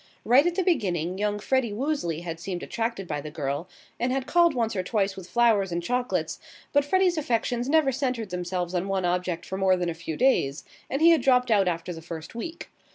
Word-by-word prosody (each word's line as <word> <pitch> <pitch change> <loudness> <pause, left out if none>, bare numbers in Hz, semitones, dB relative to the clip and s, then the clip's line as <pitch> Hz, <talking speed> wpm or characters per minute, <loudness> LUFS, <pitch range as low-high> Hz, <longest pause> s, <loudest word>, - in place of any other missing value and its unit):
Right 270 +7 +5
at 350 - -1
the 375 - +1
beginning 185 - 0
young 210 0 0
Freddie 235 +1 0
Woosley 215 - -2
had 165 -2 -6
seemed 175 +1 -5
attracted 225 -5 -3
by 150 -2 -3
the 150 - -7
girl, 150 +1 -3 0.3
and 245 +2 0
had 265 0 -1
called 340 -2 +4
once 225 -3 0
or 185 - 0
twice 195 0 0
with 185 -2 -10
flowers 225 -6 +3
and 170 0 -2
chocolates, 245 +5 -1 0.3
but 285 0 +4
Freddie's 360 +2 +2
affections 245 -1 -1
never 310 -3 +4
centred 250 -6 -2
themselves 180 0 -3
on 180 +1 -1
one 195 -2 0
object 180 -1 -1
for 190 - -5
more 190 -1 +3
than 175 -1 -1
a - - -2
few 160 -1 -6
days, 160 - +2 0.3
and 275 +4 -1
he 335 - +8
had 330 - +4
dropped 250 -3 +3
out 200 -3 +4
after 175 +1 -2
the 165 - -9
first 160 -1 -8
week. 320 +9 -7
205 Hz, 220 wpm, -26 LUFS, 175-255 Hz, 0.3 s, he